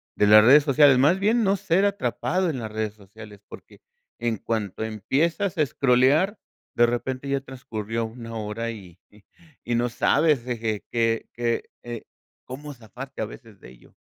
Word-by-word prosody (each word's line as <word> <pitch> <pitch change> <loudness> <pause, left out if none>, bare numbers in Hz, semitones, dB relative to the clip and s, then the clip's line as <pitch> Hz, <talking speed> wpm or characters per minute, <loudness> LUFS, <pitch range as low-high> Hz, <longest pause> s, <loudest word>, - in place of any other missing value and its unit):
de - - +3
las 105 +1 +8
redes 140 +5 +7
sociales, 140 -2 +5
más 150 +9 +4
bien, 220 +4 +2
no 195 0 +2
ser 185 +4 +1
atrapado 185 0 -1
en 140 - -3
las 110 -3 -6
redes 110 -1 -3
sociales, 105 0 -14
porque, - - -14 0.4
en 115 -2 -1
cuanto 110 -2 -3
empiezas 160 - -1
a - - +5
escrolear, 140 - +2 0.4
de 120 0 +5
repente 130 +3 -3
ya 140 - +1
transcurrió 115 -4 -5
una 115 0 -9
hora 110 +2 -4
y, 95 -4 -12 0.6
y 120 - -2
no 120 +1 +1
sabes 150 +4 +2
qué, 115 -3 -3
que 115 0 -1
eh, 120 -1 -7 0.4
cómo 145 +3 -8
zafarte 125 +2 -9
a - - 0
veces 105 -2 -13
de - - -13
ello. - - -20
120 Hz, 160 wpm, -24 LUFS, 110-140 Hz, 0.6 s, las